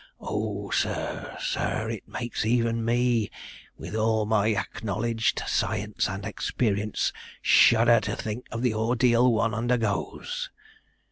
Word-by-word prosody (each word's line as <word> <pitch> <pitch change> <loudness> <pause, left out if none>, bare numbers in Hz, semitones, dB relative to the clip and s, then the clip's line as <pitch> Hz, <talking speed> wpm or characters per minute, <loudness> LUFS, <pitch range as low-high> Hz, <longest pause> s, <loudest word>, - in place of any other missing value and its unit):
Oh, 105 -1 -3
sir, - - -2
sir, - - -1
it - - -7
makes 120 -1 -3
even 115 0 +1
me, 120 -1 +2 0.5
with - - -8
all 110 0 +2
my 105 -1 +2
acknowledged 110 +2 -1
science 105 +2 -1
and 95 +1 -5
experience, 105 0 -1 0.3
shudder 115 0 +6
to - - -3
think 110 +3 -5
of 115 +2 -3
the 125 -3 +2
ordeal 120 +2 +3
one 115 -1 +1
undergoes!' 120 - -1
115 Hz, 120 wpm, -26 LUFS, 105-120 Hz, 0.5 s, shudder